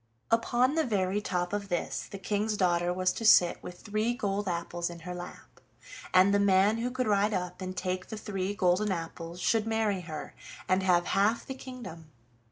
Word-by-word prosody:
Upon 240 +3 +3
the 320 0 +2
very 205 -4 0
top 180 -2 -2
of 200 -1 -3
this 175 -2 -2
the 195 - -7
King's 210 +2 -1
daughter 175 -2 +2
was 185 +1 +1
to - - -6
sit 180 -5 +6
with 180 0 -9
three 215 +3 -1
gold 200 -2 -2
apples 170 0 -2
in 170 -1 -9
her 180 +2 -6
lap, 175 0 -10 0.5
and 185 +2 +5
the 200 - +4
man 200 +2 +4
who 240 +2 -1
could 255 0 -2
ride 205 0 +2
up 180 0 -4
and 185 0 -5
take 185 0 -2
the 220 - -6
three 200 -2 -3
golden 185 +2 +2
apples 165 0 -5
should 220 +3 +1
marry 220 -4 0
her, 155 -3 -7 0.3
and 185 +1 +2
have 180 -2 +3
half 210 +4 +1
the 265 - -5
kingdom. 240 -12 -9
195 Hz, 190 wpm, -29 LUFS, 180-215 Hz, 0.5 s, sit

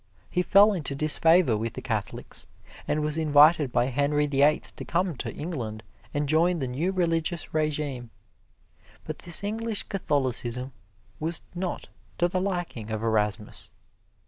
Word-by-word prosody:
He 180 - +1
fell 205 +3 +5
into 150 -7 -3
disfavor 155 -1 +4
with 115 +2 -3
the 130 - -5
Catholics, 110 -5 -4 0.4
and 150 +1 0
was 150 +1 0
invited 150 -2 +5
by 120 - +2
Henry 145 +3 +1
the 140 -1 0
Eighth 150 +1 +2
to - - -6
come 175 -1 -1
to - - -4
England 115 -10 -5 0.3
and 145 0 -1
join 170 +4 +3
the 135 -5 -2
new 150 +10 -1
religious 170 -2 -1
regime. 150 -5 -2 0.9
But - - -6
this 175 +2 0
English 220 +1 -2
Catholicism 130 - -1 0.5
was 160 +1 -2
not 180 0 -4 0.3
to 175 - +2
the 185 +1 -1
liking 175 - -3
of 110 0 -3
Erasmus. 105 -1 -1
150 Hz, 145 wpm, -26 LUFS, 130-175 Hz, 0.9 s, fell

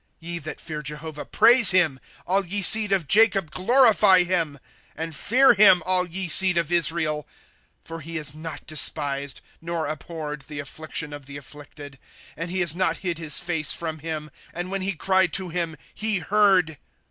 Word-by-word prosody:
^^ - - -46 0.2
Ye 170 +1 -6
that 155 0 -9
fear 155 -2 -7
Jehovah 150 +1 -6
praise 230 0 +5
him; 170 -8 +2 0.3
All 195 +2 +1
ye 200 +2 0
seed 215 +1 +6
of 185 -6 0
Jacob 195 -5 +3
glorify 205 - +4
him, 170 -5 -2 0.4
And 160 0 -6
fear 250 - +4
him 195 -5 +5
all 185 -1 0
ye 185 +2 -1
seed 180 +2 +4
of 170 0 -2
Israel. 160 -3 0 0.6
^* - - -23
For 165 0 -8
he 165 +3 -8
has 150 -3 0
not 160 +1 -9
despised, 140 -2 -1 0.2
nor 165 -1 -4
abhorred, 150 -1 -7
the 150 - -9
afSictioti 155 +1 -6
of 145 -2 -10
the 140 0 -9
afflicted^ 145 0 -13 0.4
And 165 +2 -6
has 175 -3 -1
not 170 -3 -1
hid 170 -2 -2
his 155 -3 +1
face 165 -4 -2
from 160 -2 -5
him; 155 -1 -7 0.2
And 175 +2 -5
when 195 0 -2
he 195 +1 -2
cried 190 +1 0
to 190 -2 -1
him, 165 -2 -4 0.2
he 215 -1 0
heard. 185 -4 +1
165 Hz, 180 wpm, -22 LUFS, 150-185 Hz, 0.6 s, seed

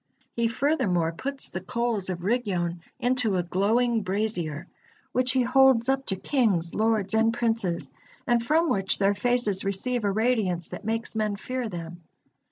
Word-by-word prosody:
He 235 -1 +1
furthermore 230 - +1
puts 270 +11 -4
the 185 - -4
coals 230 -1 -2
of 175 -1 -4
Rigyon 185 -6 -1 0.2
into 245 -5 +1
a 175 - 0
glowing 225 +6 +1
brazier, 185 -5 -2 0.5
which 255 0 +2
he 260 -1 +3
holds 260 -1 +4
up 270 0 0
to 190 - 0
kings, 190 - +1
lords, 220 -2 +1
and 225 +1 +3
princes, 225 -7 -1 0.3
and 240 -1 +2
from 315 +7 +2
which 195 -8 +2
their 200 0 +3
faces 215 -2 +1
receive 215 +5 -1
a 200 - +1
radiance 210 -6 0
that - - -8
makes 225 +1 -2
men 215 -2 0
fear 250 +3 -4
them. 170 -1 -7
220 Hz, 160 wpm, -26 LUFS, 190-245 Hz, 0.5 s, holds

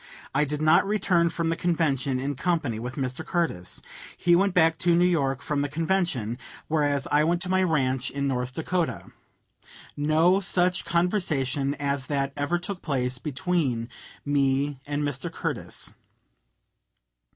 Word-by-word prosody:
I 150 +2 +3
did 150 +1 -3
not 155 - +5
return 185 -5 +2
from 165 0 -2
the 165 - +1
convention 140 -7 0
in 140 +2 -2
company 140 -6 -1
with 125 +3 -5
Mr. 130 +2 -3
Curtis. 160 - -2 0.3
He 175 0 +4
went 195 +1 +2
back 165 -2 +4
to 170 -1 +3
New 175 +1 +4
York 140 -7 +1
from 150 -3 -1
the 145 - -1
convention, 155 - -1 0.3
whereas 145 -3 +1
I 150 +1 +4
went 170 +2 +1
to 180 - -6
my 185 0 +3
ranch 135 -7 +1
in 140 0 -2
North 125 -1 -1
Dakota. 165 +4 -2 0.8
No 160 +6 +3
such 180 -1 +2
conversation 150 -7 0
as 140 -2 -2
that 140 -1 -1
ever 145 +5 0
took 180 +2 -6
place 125 -4 -1
between 145 -5 -1 0.4
me 140 -1 +1
and 145 0 -1
Mr. 145 -2 -3
Curtis. - - -2
150 Hz, 150 wpm, -26 LUFS, 135-175 Hz, 0.8 s, not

